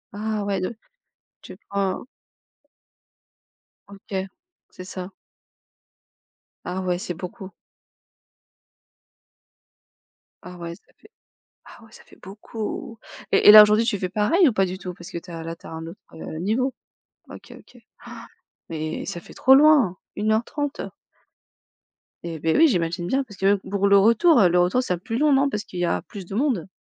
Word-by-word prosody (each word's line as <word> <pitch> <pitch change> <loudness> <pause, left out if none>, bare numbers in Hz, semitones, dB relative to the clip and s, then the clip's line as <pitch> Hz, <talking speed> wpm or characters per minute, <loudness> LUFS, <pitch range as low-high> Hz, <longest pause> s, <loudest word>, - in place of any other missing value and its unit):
Ah 215 0 -3
ouais 195 -2 -1
de 185 +6 -4 0.7
tu - - -12
prends? 195 -2 -2 1.9
OK. 195 -1 -6 0.4
C'est 185 - -11
ça. 185 0 -8 1.5
Ah 185 - -4
ouais, 180 -1 -1
c'est 180 - -5
beaucoup. 185 +2 -9 2.9
Ah 180 0 -10
ouais, 170 -1 -7
ça 210 - -24 0.2
fait 425 - -20 0.6
ah - - -15
oui 225 - -17
ça - - -15
fait - - -20
beaucoup! 215 +3 -7 0.4
Et - - +4
et - - +14
là 215 - +12
aujourd'hui 210 +2 +3
tu 230 -4 0
fais 185 -1 -3
pareil 215 - +3
ou - - -3
pas 195 -2 +2
du 185 +1 -5
tout 180 -1 -7
parce 175 -1 -12
que - - -5
tu 180 +1 -10
as 165 -1 -7
là 165 0 -6
tu - - -19
as - - -9
un 160 0 -7
autre, 170 - -11
heu, 160 0 -8
niveau? 235 +9 0 0.6
OK, - - -12
OK. - - -20 0.3
Han! - - -10 0.4
Mais 155 0 -4
ça 175 - -5
fait - - -15
trop 265 +1 +5
loin! 280 - +5 0.2
1 215 +1 0
heure 220 +2 +1
30! 290 +1 -4 1.5
Et 165 -2 -5
beh, 160 +1 0
oui, 325 0 +6
j'imagine 175 -4 -1
bien, 265 +10 0
parce 205 -5 -14
que 195 - -3
même 200 0 +4
pour 200 0 +1
le 200 - +6
retour, 235 - +5
heu, 195 - +6
le 175 +1 +1
retour 180 +8 +2
sera 180 -8 -2
plus 225 +6 -5
long, 295 +2 +3
non? 275 +1 +3
Parce 210 -3 -4
qu'il 180 - -8
y 175 - +1
a - - -1
plus 195 -3 -10
de 195 - -8
monde? 245 - 0
195 Hz, 175 wpm, -23 LUFS, 180-225 Hz, 2.9 s, et